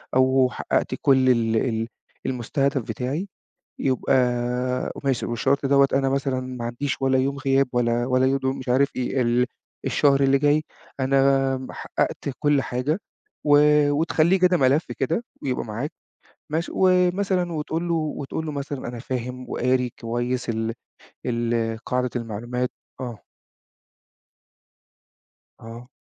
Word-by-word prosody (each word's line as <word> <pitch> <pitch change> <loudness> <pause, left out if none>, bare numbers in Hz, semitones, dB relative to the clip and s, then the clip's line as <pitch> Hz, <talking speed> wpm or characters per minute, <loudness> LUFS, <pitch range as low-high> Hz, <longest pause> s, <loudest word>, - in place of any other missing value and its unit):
أو 130 0 +4
حققت - - -1
كُل 130 -2 +4
ال 115 -2 +2
ال 115 -1 0 0.4
المُستهدَف 135 +2 0
بتاعي، 135 - -3 0.5
يُبقى 130 -1 +1 0.9
ماشي، 135 -3 0
والشرط 135 +4 0
دوّة 140 0 +5
أنا 135 0 +2
مثلًا 135 -1 0
ما 130 -2 -6
عنديش 130 +4 -3
ولا 135 0 +3
يوم 140 +2 0
غياب، 135 0 +2
ولا، 120 0 +1
ولا 130 0 +3
يوم 135 0 0
مش 130 - -8
عارف 135 +3 +4
إيه. 130 +1 0
ال 120 +1 +2 0.4
الشهر 140 -1 +3
اللي 135 0 +4
جاي 145 +2 +3 0.4
أنا 135 0 +3
ما 130 0 -7
حققت - - -2
كُل 145 -2 +2
حاجة، 130 +8 -1 0.5
و 145 -1 +6 0.3
وتخليه 160 +4 +2
كده 180 0 +4
ملف 140 +1 +3
كده، 165 - 0 0.2
ويبقى 130 -2 -1
معاك. 115 +7 -4 0.6
ماشي؟ 165 +2 -1
ومثلًا، 185 -1 +2
وتقول 160 +2 -2
له، 170 - +1
وتقول 155 0 -3
له 155 - -3
مثلًا 140 -1 -4
أنا 120 0 -6
فاهم 125 +1 -5
وقاري 125 -1 +1
كويس 120 +2 -2
ال 115 0 -1 0.5
ال 115 -1 0
قاعدة 125 -1 0
المعلومات 120 +2 -3 0.3
آه. 120 -6 -6 2.4
آه. 115 +2 -10
130 Hz, 130 wpm, -24 LUFS, 125-145 Hz, 2.4 s, و